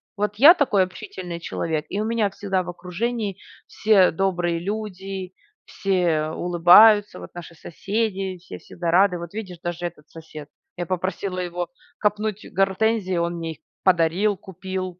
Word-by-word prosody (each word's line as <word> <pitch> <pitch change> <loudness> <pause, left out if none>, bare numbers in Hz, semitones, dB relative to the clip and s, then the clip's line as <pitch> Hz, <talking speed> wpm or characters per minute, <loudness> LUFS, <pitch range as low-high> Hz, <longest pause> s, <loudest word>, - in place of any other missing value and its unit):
Вот 210 0 -2
я 290 +10 +9
такой 235 - +2
общительный 180 -1 -7
человек 160 -2 -3
и 200 - -3
у - - -1
меня 225 -3 +1
всегда 195 -2 -2
в - - -8
окружении 200 +4 -3 0.3
все 205 -4 +4
добрые 175 -1 0
люди, 195 -1 -5 0.3
все 175 -6 0
улыбаются. 180 +6 +5
Вот - - -11
наши 170 -1 -9
соседи, 195 +2 -3
все 90 - -11
всегда 170 -1 -4
рады. 185 0 +4
Вот 170 +2 -8
видишь, 185 -6 -7
даже 175 0 -4
этот 155 -3 -8
сосед. 155 -2 -11 0.3
Я 175 - -3
попросила 185 +1 -3
его 175 0 -4 0.3
копнуть 210 0 -1
гортензии, 195 -1 +1
он 170 0 0
мне 165 -1 -4
их - - -19 0.3
подарил, 185 +3 +2
купил. 185 -1 -6
185 Hz, 150 wpm, -23 LUFS, 175-205 Hz, 0.3 s, я